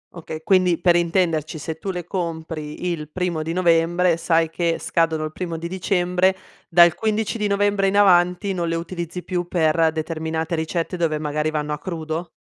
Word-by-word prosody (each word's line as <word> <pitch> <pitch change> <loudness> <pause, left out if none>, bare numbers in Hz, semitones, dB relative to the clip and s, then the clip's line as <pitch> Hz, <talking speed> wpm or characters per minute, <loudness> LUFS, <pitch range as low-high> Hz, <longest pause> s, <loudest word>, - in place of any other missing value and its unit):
Okay, 160 -2 -7
quindi 180 -1 +3
per 175 0 +3
intenderci 170 -3 +1
se 160 +1 -6
tu 195 - -5
le 180 -2 -3
compri 165 -3 -5
il 155 -3 -5
primo 175 -1 -2
di 160 +1 -3
novembre, 170 0 +3
sai 165 -1 +1
che 170 0 0
scadono 160 -2 0
il 155 - -4
primo 170 0 -4
di 165 +1 -5
dicembre, 180 0 +1 0.3
dal 170 -1 +6
15 220 +2 -1
di 210 - +1
novembre 200 -1 +2
in 200 - +1
avanti 180 0 +4
non 175 -2 -2
le 165 - -1
utilizzi 170 +1 -5
più 175 -2 -3
per 160 -2 +2
determinate 160 +1 -3
ricette 165 +2 -2
dove 165 -3 0
magari 150 +1 -1
vanno 150 -1 -2
a 150 - -5
crudo? 160 0 -4
170 Hz, 180 wpm, -22 LUFS, 160-180 Hz, 0.3 s, dal